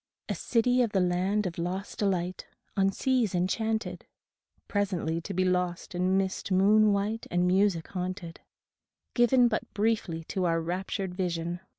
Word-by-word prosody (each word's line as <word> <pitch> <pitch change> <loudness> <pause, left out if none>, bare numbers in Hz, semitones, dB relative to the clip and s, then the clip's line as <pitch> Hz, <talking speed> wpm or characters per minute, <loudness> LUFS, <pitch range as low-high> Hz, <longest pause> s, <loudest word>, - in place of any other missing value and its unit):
A - - -1
city 245 +1 +2
of 230 -4 0
the 195 - +3
Land 185 +3 +1
of 170 -2 -4
Lost 185 +3 -4
Delight 185 -3 -1 0.3
On 195 0 +3
seas 245 -3 +1
enchanted. 220 +5 -1 0.6
Presently 180 -6 -1
to 200 - -6
be 185 0 +1
lost 180 +1 -1
in 185 +2 +1
mist 195 0 -2
moon 210 +3 +5
white 205 +3 -1
And 175 0 +1
music 185 -2 +2
haunted; 180 -2 -5 0.7
Given 240 0 +5
but 220 -2 -2
briefly 205 -6 0
to 185 +3 -2
our 165 -1 +2
raptured 180 +3 -3
vision. 175 -2 -2
190 Hz, 150 wpm, -28 LUFS, 180-210 Hz, 0.7 s, moon